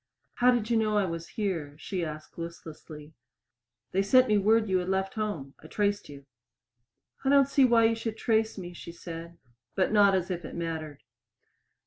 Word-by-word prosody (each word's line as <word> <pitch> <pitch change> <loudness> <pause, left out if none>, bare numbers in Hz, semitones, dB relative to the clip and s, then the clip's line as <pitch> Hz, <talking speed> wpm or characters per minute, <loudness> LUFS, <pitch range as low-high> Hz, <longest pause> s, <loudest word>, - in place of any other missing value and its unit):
"How 245 +1 +5
did 240 -2 +1
you 230 - +4
know 215 -1 +1
I 205 - +3
was 165 -1 -5
here?" 170 -9 -2
she 180 +2 -4
asked 155 -1 -7
listlessly. 160 -2 -9 0.8
"They 190 - +2
sent 255 +6 +5
me 210 -2 +3
word 220 +2 +3
you 190 -1 +2
had 180 +1 -4
left 190 0 -1
home. 205 -11 -4
I - - -10
traced 205 +1 -1
you." 140 -1 -11 1.0
"I 270 - +1
don't 275 -1 +5
see 275 -1 +4
why 235 -2 +4
you 225 - +4
should 225 -1 -4
trace 220 -2 +1
me," 175 -2 -7
she 170 - -9
said, 170 0 -9 0.4
but 190 0 +1
not 200 -2 +5
as 185 0 -1
if 175 -1 -4
it - - -8
mattered. 160 -3 -5
190 Hz, 185 wpm, -28 LUFS, 165-220 Hz, 1.0 s, How